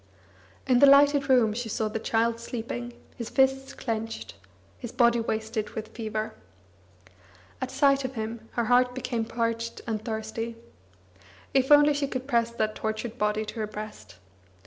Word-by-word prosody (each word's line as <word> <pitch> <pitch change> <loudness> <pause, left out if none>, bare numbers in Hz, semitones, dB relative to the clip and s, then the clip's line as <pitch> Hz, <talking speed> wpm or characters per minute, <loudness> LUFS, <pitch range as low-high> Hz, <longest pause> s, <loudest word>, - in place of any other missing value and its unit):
In 250 -2 +4
the 280 - +8
lighted 280 0 +6
room 240 -5 +4
she 235 0 -4
saw 220 +1 -1
the 215 +1 -3
child 230 +1 +1
sleeping, 240 +1 -5 0.2
his 235 -2 -5
fists 270 0 +1
clenched, 225 -2 -4 0.5
his 240 - -6
body 235 -1 +3
wasted 220 -1 -2
with 220 0 -5
fever. 220 -1 -4 1.3
At 260 - -2
sight 275 +1 +3
of 260 0 -4
him, 225 0 -5
her 235 - 0
heart 250 +1 +3
became 245 -3 -2
parched 230 0 -2
and 220 -2 -3
thirsty. 225 +1 -4 1.0
If 265 +1 +2
only 295 0 +7
she 285 -1 -1
could 255 -1 -4
press 235 -3 +2
that 220 -2 -1
tortured 220 +2 -4
body 210 +1 0
to 220 +2 -7
her 215 - -1
breast! 210 - -9
235 Hz, 155 wpm, -27 LUFS, 220-255 Hz, 1.3 s, the